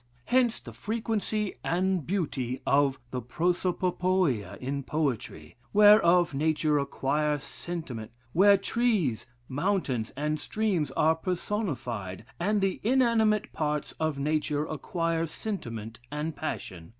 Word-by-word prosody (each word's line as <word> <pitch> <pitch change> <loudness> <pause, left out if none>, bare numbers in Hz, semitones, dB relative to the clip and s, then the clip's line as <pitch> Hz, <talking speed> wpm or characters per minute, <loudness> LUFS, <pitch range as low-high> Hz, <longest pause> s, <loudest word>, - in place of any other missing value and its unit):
Hence 245 -2 +2
the - - -11
frequency 215 -2 -2
and 180 -2 0
beauty 140 -9 -1
of 140 -1 +3
the 125 - -2
prosopopoia 180 - 0
in 140 +2 -3
poetry; 125 - -3 0.2
where 210 +1 +8 2.6
trees, 195 - 0 0.2
mountains, 140 - -1
and 150 +1 -1
streams 195 -3 -1
are 160 +1 +3
personified, 135 - -3
and 205 +4 +1
the 195 -1 0
inanimate 225 -3 +2
parts 150 -1 -1
of 155 -2 0
nature 150 +1 0
acquire 165 +1 -1
sentiment 115 - -5
and 150 +1 -3
passion. 90 - -5
160 Hz, 95 wpm, -28 LUFS, 140-200 Hz, 2.6 s, where